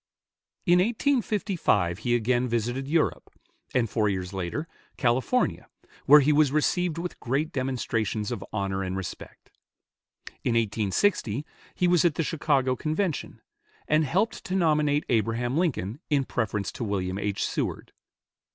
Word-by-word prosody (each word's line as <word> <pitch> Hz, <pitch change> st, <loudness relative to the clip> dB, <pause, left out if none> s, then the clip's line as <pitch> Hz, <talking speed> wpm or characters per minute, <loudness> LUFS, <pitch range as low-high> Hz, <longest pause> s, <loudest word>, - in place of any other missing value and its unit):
In 175 Hz, -1 st, +5 dB
1855 205 Hz, -, +1 dB
he 120 Hz, +1 st, +1 dB
again 120 Hz, +2 st, +1 dB
visited 120 Hz, +3 st, -2 dB
Europe; 160 Hz, +1 st, 0 dB, 0.5 s
and 120 Hz, -2 st, +3 dB
four 105 Hz, -1 st, +1 dB
years 95 Hz, -1 st, -3 dB
later, 95 Hz, -, -3 dB, 0.3 s
California, 130 Hz, -, +1 dB, 0.4 s
where 150 Hz, +2 st, +9 dB
he 150 Hz, +2 st, +3 dB
was 145 Hz, -2 st, +4 dB
received 165 Hz, +3 st, +1 dB
with 175 Hz, +1 st, -5 dB
great 140 Hz, +6 st, -1 dB
demonstrations 115 Hz, -, -2 dB
of 110 Hz, -5 st, -4 dB
honor 95 Hz, -2 st, -2 dB
and 95 Hz, 0 st, -3 dB
respect. 95 Hz, -, -8 dB, 0.9 s
In 120 Hz, -, +1 dB
1860 115 Hz, -, +1 dB, 0.3 s
he 180 Hz, -, +2 dB
was 175 Hz, -2 st, +4 dB
at 170 Hz, -4 st, +2 dB
the 165 Hz, -, 0 dB
Chicago 140 Hz, -5 st, +1 dB
Convention, 155 Hz, +3 st, -2 dB, 0.5 s
and 155 Hz, +1 st, +3 dB
helped 190 Hz, -, 0 dB
to 185 Hz, -, -2 dB
nominate 150 Hz, -4 st, +2 dB
Abraham 115 Hz, +2 st, 0 dB
Lincoln 140 Hz, -, -1 dB
in 145 Hz, -3 st, +2 dB
preference 105 Hz, -4 st, -2 dB
to -, -, -6 dB
William 95 Hz, -3 st, -2 dB
H. 100 Hz, -1 st, -1 dB
Seward. -, -, -3 dB
130 Hz, 135 wpm, -26 LUFS, 110-160 Hz, 0.9 s, where